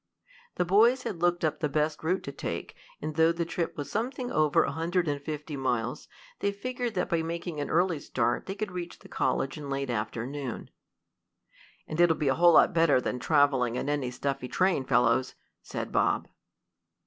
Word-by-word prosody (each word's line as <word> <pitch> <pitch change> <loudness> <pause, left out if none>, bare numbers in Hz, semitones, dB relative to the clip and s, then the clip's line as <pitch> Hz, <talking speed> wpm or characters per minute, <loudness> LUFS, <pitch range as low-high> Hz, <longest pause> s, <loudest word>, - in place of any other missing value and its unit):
The 180 - +1
boys 230 +8 +4
had 175 -5 -5
looked 175 -1 +2
up 155 - -1
the 150 - 0
best 150 +2 -1
route 180 +4 0
to - - -5
take, - - -5 0.3
and 155 - -3
though 160 +1 +5
the 170 0 -2
trip 170 0 -3
was 145 - -5
something 250 +3 -2
over 155 +1 +3
a - - -1
hundred 170 +2 0
and 145 -1 -1
fifty 150 +1 -5
miles, 125 -3 -2 0.3
they 200 - +1
figured 245 +3 -4
that 180 - 0
by 170 -1 +1
making 165 -1 -4
an 145 - -3
early 170 -1 +2
start 120 -3 -1
they 195 - -4
could 210 -1 -4
reach 175 -1 -6
the - - -15
college 135 +2 -1
in 150 - -7
the - - -6
late 135 -1 -2
afternoon. 120 +4 -4 1.2
"And 155 +2 0
it'll 170 -2 +5
be 145 - +1
a - - +4
whole 175 +2 +5
lot - - +6
better 165 -5 +4
than 125 0 -3
traveling 135 -5 +3
in 125 - -2
a 145 -3 0
stuffy 135 +1 -3
train, 180 -3 +1
fellows," 125 +1 +2 0.3
said - - -5
Bob. - - +1
155 Hz, 195 wpm, -28 LUFS, 135-175 Hz, 1.2 s, lot